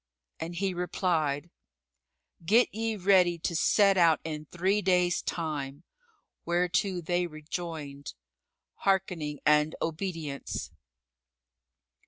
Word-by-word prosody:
And 170 +2 -5
he 195 +1 -1
replied, 170 -4 -1 0.9
"Get 225 +9 +4
ye 225 +1 -1
ready 185 -3 +4
to 170 +1 -3
set 200 +3 +4
out 165 -2 +5
in 155 -1 -5
three 190 +6 +1
days' 180 -2 +2
time;" 150 -3 -4 0.6
whereto 180 +2 0
they 175 +1 0
rejoined 155 -3 -6 0.6
"Harkening 180 -7 0
and 150 +1 +4
obedience!" 165 -4 -4
175 Hz, 95 wpm, -29 LUFS, 155-185 Hz, 0.9 s, out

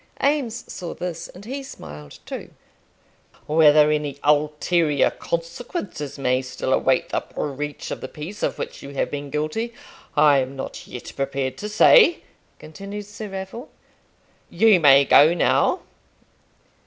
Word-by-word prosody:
Eames 270 -5 0
saw 175 -2 -7
this, 170 -2 -5
and 190 +3 -13
he 270 +4 -5
smiled 75 - -11
too. - - -7 1.0
"Whether 150 -1 +5
any 150 -2 -2
ulterior 150 +1 +2
consequences 170 - -5
may 130 -1 +1
still 130 - -3
await - - +2
the - - 0
breach 145 0 -5
of - - -5
the - - -5
peace 160 +10 -9
of - - -1
which - - -6
you 140 0 -10
have - - -1
been 145 -1 -5
guilty, 155 - -3 0.4
I 145 -2 +6
am 130 +1 -3
not 135 - -7
yet 125 - -9
prepared 135 -1 -2
to 210 - -5
say," 345 - +6 0.3
continued 200 +6 -8
Sir 210 +1 -8
Raffle. 195 +6 -7 0.8
"You 210 +1 +5
may 140 -3 +6
go 155 +5 +6
now." - - +2
155 Hz, 140 wpm, -23 LUFS, 140-200 Hz, 1.0 s, I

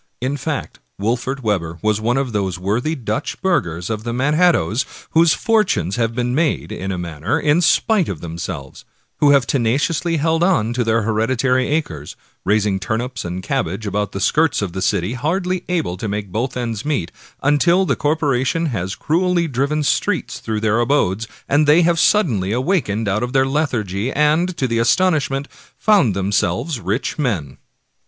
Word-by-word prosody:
In 130 +3 -1
fact 145 +1 -4 0.2
Wolfert 120 +5 -2
Webber 85 -6 -1
was 110 0 +1
one 120 +3 +1
of 135 -2 -1
those 100 -4 -1
worthy 110 - -1
Dutch 110 -5 -3
burghers 85 - 0
of 110 -1 -3
the 120 - -3
Manhattoes 140 - +2 0.3
whose 165 0 +4
fortunes 205 - +1
have 115 -1 0
been 125 0 -1
made, 155 +2 0
in 95 +1 -4
a 95 - -3
manner, 85 +1 -2
in 150 +3 +2
spite 195 +2 +3
of 90 - -4
themselves; 85 -4 -7 0.3
who 145 - +4
have 140 -3 +5
tenaciously 140 +8 0
held 160 +2 +1
on 145 - +2
to 120 0 0
their 115 0 +1
heredi 115 +4 0
tary 130 +1 +2
acres, 85 - -3 0.3
raising 100 -1 +1
turnips 115 +4 -3
and 90 +1 -5
cabbages 95 +6 -2
about 105 +1 -1
the 100 - -5
skirts 155 +4 +2
of 90 -4 -4
the 95 - -4
city, 90 +6 0
hardly 180 +7 -1
able 165 - -1
to 105 - -4
make 100 -1 -4
both 120 +5 -2
ends 115 -4 -3
meet, 145 - -2 0.3
until 170 +6 +3
the - - +1
corporation 145 0 0
has 95 -1 -3
cruelly 170 - +1
driven 140 +3 0
streets - - 0
through 110 -1 -3
their 110 +1 +2
abodes, 115 -4 +1 0.2
and 145 +2 +3
they 155 +4 +6
have 170 0 +2
suddenly 120 - +2
awakened 120 - 0
out 100 +2 0
of 125 +1 -3
their 135 0 +4
lethargy, 125 - -1
and, 160 +4 +1
to 130 - 0
their 115 -1 0
astonishment, 145 -1 +1 0.3
found 190 - +3
themselves 100 - 0
rich 105 - -2
men. 95 - -2
125 Hz, 170 wpm, -19 LUFS, 100-150 Hz, 0.3 s, they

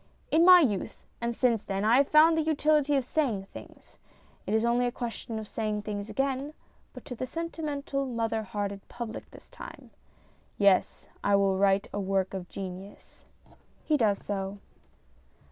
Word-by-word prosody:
In 325 +2 +5
my 360 0 +9
youth, 210 - -2 0.2
and 235 0 -2
since 235 -4 +2
then, 195 +1 -2
I 230 +3 +5
have 275 0 +4
found 315 +2 +6
the 320 - +2
utility 300 -2 +2
of 270 -3 +1
saying 250 -9 0
things; - - -13 0.5
it 215 - +1
is 220 +1 +2
only 240 +1 +2
a - - -1
question 235 -2 -5
of 215 -1 -6
saying 215 -1 -3
things 205 0 -5
again, 275 +2 -2 0.4
but - - -12
to 280 - -6
the 255 +2 -4
sentimental 295 -4 -3
mother 225 -2 -1
hearted 200 -1 -4
public 235 -2 -7
this - - -15
time. - - -11 0.7
Yes, 200 -2 +3 0.2
I 205 - +3
will 195 -1 +3
write 195 0 +2
a 205 - -2
work 190 -1 0
of 185 -2 -6
genius. 190 +1 -9 0.6
[He 310 - +2
does 215 -7 +2
so. 195 0 -3
230 Hz, 165 wpm, -28 LUFS, 200-280 Hz, 0.7 s, my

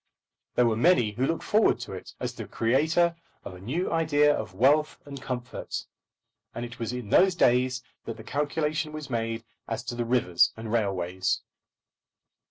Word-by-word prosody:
There 125 - +4
were 115 -2 +2
many 120 -4 +4
who 125 +5 0
looked 165 - -1
forward 215 +1 +3
to - - -6
it - - -9
as - - -3
the - - -7
creator 160 +8 +2 0.3
of 95 - -7
a 90 - -11
new 150 - -2
idea 150 -3 +4
of 95 - -5
wealth 145 +8 +3
and 140 -2 -8
comfort; 125 -2 -5 0.7
and 120 +1 -3
it 120 0 -10
was 115 0 -2
in 125 -4 -5
those 185 - +5
days 125 -3 +3 0.2
that 115 - -5
the 110 - -10
calculation 150 +3 -1
was 150 -3 -7
made 115 -1 -2 0.2
as 115 - -3
to 120 0 -4
the 120 0 -1
rivers 115 -8 +3
and 110 -1 -6
railways. 95 -4 0
125 Hz, 175 wpm, -27 LUFS, 115-150 Hz, 0.7 s, those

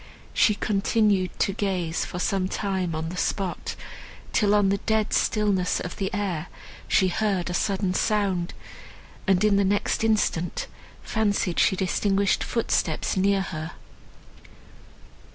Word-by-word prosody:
She 210 - +4
continued 200 -2 +1
to 195 - +2
gaze 185 -5 -1
for - - -6
some 185 +1 0
time 190 -4 -2
on 160 +1 -3
the 180 - -6
spot, 190 0 -2 0.6
till 210 -1 +3
on 205 -2 +4
the 200 0 +1
dead 220 0 0
stillness 200 -4 +1
of 180 - -6
the 195 -1 -2
air 185 -5 -2 0.4
she 190 - +3
heard 190 -2 0
a - - -3
sudden 190 0 0
sound, 195 -4 0 0.7
and 190 0 +3
in 210 -2 +4
the 200 - +3
next 200 +3 0
instant 205 -6 0 0.4
fancied 205 -5 0
she - - +4
distinguished 195 +1 +1
footsteps 180 -8 0
near 195 +1 +2
her. 160 -3 -5
195 Hz, 135 wpm, -25 LUFS, 180-205 Hz, 0.7 s, She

